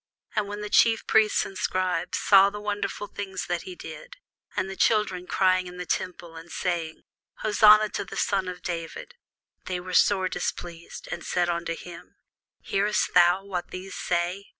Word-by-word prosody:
And 210 -1 0
when 205 +1 -6
the 210 - -5
chief 225 -1 +4
priests 220 -1 +3
and 195 - -9
scribes 185 -1 -1
saw 195 -1 +6
the 210 +1 -7
wonderful 205 0 -3
things 195 -2 -5
that 175 - -2
he 370 - -7
did, - - -10 0.4
and 190 - 0
the 195 - -6
children 190 -4 +1
crying 185 -1 +2
in 180 0 -10
the 180 - -5
temple, 175 -2 -4
and 165 +1 -11
saying, 170 -3 -3 0.4
Hosanna 215 0 +6
to - - -3
the - - -9
son 195 -2 0
of 180 -1 -7
David; 170 - -5 0.5
they 180 -1 -2
were 180 +1 -7
sore 190 0 +4
displeased, 170 -2 -5
and 170 - -5
said 175 -1 0
unto 170 -1 -2
him, 175 -1 -11 0.5
Hearest 205 +1 0
thou 180 +2 +5
what 180 -3 -4
these 185 +1 -8
say? 180 +3 -2
185 Hz, 175 wpm, -26 LUFS, 175-205 Hz, 0.5 s, saw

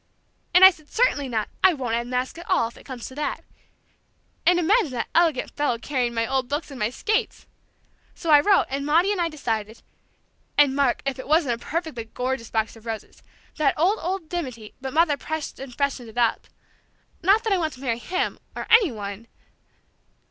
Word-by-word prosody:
"...and 370 +1 +10
I 380 - +10
said, 310 -4 -19
'Certainly 290 - +1
not! 220 -3 -1 0.2
I 375 -3 +6
won't 250 -5 -3
unmask 250 +5 -2
at 345 - -11
all, 370 -11 +3
if - - -19
it - - -16
comes 255 -4 -7
to - - -8
that!'... 290 +1 -3 1.0
And 355 0 +6
imagine 360 +2 +3
that 240 - -3
elegant 325 -6 +2
fellow 290 -5 0
carrying 245 -1 -2
my 230 0 +1
old 260 +1 -1
books 290 +1 -3
and 270 - -8
my 210 - +1
skates! 430 - -1 0.7
So 330 - -2
I 295 - +9
wrote, 390 +6 +4
and 275 +1 -2
Maudie 330 +7 +3
and 395 -4 0
I 335 - +1
decided... 225 -8 -4 0.7
And 285 -2 +5
Mark, 275 -3 +1
if 275 -1 -2
it - - -7
wasn't 285 -7 +2
a - - -12
perfectly 315 -8 -3
gorgeous 250 +1 -3
box 220 0 -1
of 225 +1 -15
roses!... 220 -1 -6 0.4
That 305 -2 +2
old, 370 +8 +2
old 365 -1 -3
dimity, 255 -11 -5
but 265 0 -4
Mother 310 -1 +3
pressed 315 +1 -5
and 270 -1 -8
freshened 270 -2 -2
it 220 - -14
up.... 235 -2 +1 0.7
Not 395 +6 +4
that 445 -3 +1
I 380 - +2
want 315 -3 -1
to 255 - -13
marry 235 -4 -1
him, 370 +9 -2 0.2
or - - -4
any 445 - +6
one..." 205 0 -7
280 Hz, 200 wpm, -24 LUFS, 240-335 Hz, 1.0 s, and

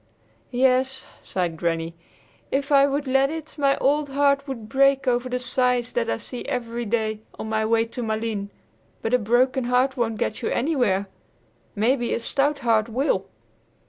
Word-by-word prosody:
"Yes," 260 +1 +1 0.2
sighed 175 -3 -2
Granny; 165 0 -1 0.6
"if 280 +1 -1
I 280 0 +6
would 285 +1 -1
let 270 +1 +3
it, 315 0 -6
my 275 -2 +2
old 290 +1 +1
heart 280 0 +2
would 235 -5 -6
break 275 +2 +3
over 245 0 +1
the 250 - -1
sights 250 -1 0
that - - -1
I 115 - 0
see 245 - -7
every 240 -3 -3
day 220 -1 -1 0.2
on 220 - -5
my 220 0 0
way 225 0 +3
to 240 +2 -7
Malines. 220 -2 -2 0.5
But 225 - -1
a 250 - +5
broken 245 +4 +2
heart 255 +2 +2
won't 225 -2 0
get 210 - -2
you - - -1
anywhere. 240 -9 +1 0.7
Maybe 240 +3 +1
a - - -2
stout 280 +5 0
heart 225 -1 +3
will." 260 +6 0
250 Hz, 170 wpm, -24 LUFS, 225-275 Hz, 0.7 s, I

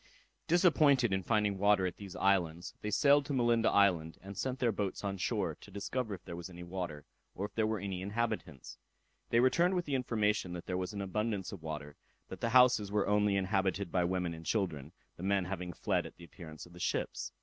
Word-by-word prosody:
Disappointed 150 - +4
in 95 - +1
finding 105 -1 +1
water 100 -1 +4
at 90 - -3
these 100 -3 -9
islands, 90 -3 +1
they 105 - -3
sailed 140 +6 +5
to 145 - -2
Malinda 120 -3 +3
island, 90 -6 +3
and 100 +1 -8
sent 130 +6 -2
their 120 -3 +2
boats 100 -1 -3
on 100 -1 -2
shore, - - 0
to - - -13
discover 110 +1 -3
if 90 - -16
there 85 - -6
was 85 +1 -7
any 90 -1 -9
water, 85 -5 -5 0.3
or 100 - -2
if - - -8
there 110 -1 +1
were 110 0 0
any 95 -2 -4
inhabitants.. 105 - -3 0.5
They 115 - +3
returned 170 +9 +3
with 175 -1 -1
the 145 - -3
information, 105 -7 0
that 85 - -6
there 90 - -3
was 90 0 -2
abundance 100 0 -2
of 100 -5 -8
water, 75 -2 -6 0.3
that - - -8
the 115 - +1
houses 125 -4 +5
were 105 -1 +1
only 105 -1 +2
inhabited 95 -1 0
by 90 - +2
women 90 -1 -1
and 80 0 -9
children, 80 -7 -2 0.3
the - - -10
men 100 -1 +1
having 90 -1 -4
fled - - -1
at - - -14
the - - -15
appearance 80 -3 -10
of 85 - -16
the 90 - -12
ships. - - -2
100 Hz, 215 wpm, -33 LUFS, 90-110 Hz, 0.5 s, sailed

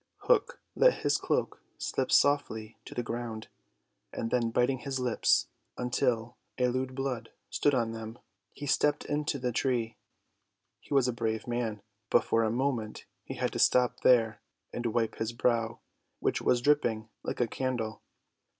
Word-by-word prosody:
Hook 485 0 +2
let - - +4
his - - +3
cloak - - -1 0.2
slip - - -2
softly 115 -7 +2
to - - -10
the 120 - -1
ground, 115 -1 -5 0.6
and 115 - -4
then 120 -2 +2
biting 125 +3 +1
his 130 +1 -3
lips 125 -3 +2 0.4
till 120 -1 0 0.2
a 125 -1 +2
lewd 130 +1 -2
blood 130 -4 -3 0.2
stood 145 -2 +2
on 115 -3 +1
them, 115 0 -7 0.3
he 145 - -8
stepped 145 +1 +2
into 150 0 -1
the 125 -2 -1
tree. 115 -3 0 0.8
He - - -23
was 135 -3 +4
a 125 - 0
brave 110 -2 -2
man, 115 -4 -2 0.3
but - - +4
for 115 - +2
a 110 - +2
moment 120 -3 -2 0.2
he - - -7
had - - -1
to - - -3
stop 125 -1 +4
there 115 -4 +4 0.3
and 120 0 -2
wipe 115 0 0
his 110 +1 -2
brow, 115 -1 0 0.4
which - - 0
was 120 - +2
dripping 120 -6 +2
like - - -4
a 120 - +3
candle. 115 -3 -3
120 Hz, 160 wpm, -30 LUFS, 115-130 Hz, 0.8 s, let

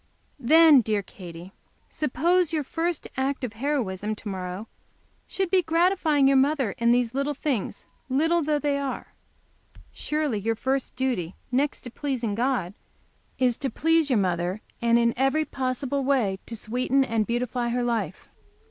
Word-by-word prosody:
"Then, 305 +1 +7
dear 215 -2 -1
Katy, 180 -1 -11 0.4
suppose 330 +5 +1
your 310 -2 0
first 330 +3 -2
act 270 +1 -1
of 235 -4 -3
heroism 215 -6 -2
to 215 - -10
morrow 190 +2 -5 0.6
should 385 -2 -2
be 380 - +5
the 355 - -2
gratifying 325 -4 +3
your 275 0 +5
mother 270 -4 +2
in 235 0 +3
these 240 -1 +2
little 280 +2 -1
things, 260 -8 -3 0.2
little 325 +6 +2
though 300 0 +1
they 285 -1 0
are. 275 -1 -5 0.8
Surely 300 -7 -2
your 225 +3 -1
first 265 +3 -2
duty, 245 -10 -2 0.2
next 275 +3 0
to 245 - -9
pleasing 250 -6 -2
God, 235 -5 0 0.6
is 250 -2 +1
to 275 - -1
please 325 0 +2
your 250 - +3
mother, 180 +1 -1 0.2
and 235 0 +4
in 235 0 +3
every 270 +4 +1
possible 270 +1 -2
way 245 -9 +1
to 230 - -5
sweeten 250 +5 +1
and 225 -4 0
beautify 240 0 -1
her 245 +1 0
life. 235 -1 -2
255 Hz, 155 wpm, -25 LUFS, 225-290 Hz, 0.8 s, Then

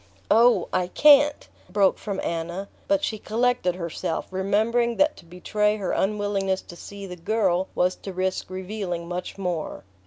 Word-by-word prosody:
"Oh, 235 +3 +5
I 185 -1 +1
can't 290 +6 +5
" - - -29
broke 200 -2 +2
from 200 -2 -4
Anna; 170 +4 -3 0.2
but 295 0 +2
she 215 - -2
collected 230 -4 0
herself, 170 -2 -3
remembering 220 +5 +1
that 300 +1 +3
to - - -15
betray 210 +5 0
her 195 -3 -2
unwillingness 195 -2 0
to 175 - -12
see 200 +3 -9
the 180 -2 -7
girl 190 0 0
was 180 +1 +2
to 195 - -7
risk 185 0 -2
revealing 185 -2 -4
much 180 +2 -5
more. 180 -5 -3
195 Hz, 160 wpm, -25 LUFS, 180-215 Hz, 0.2 s, Oh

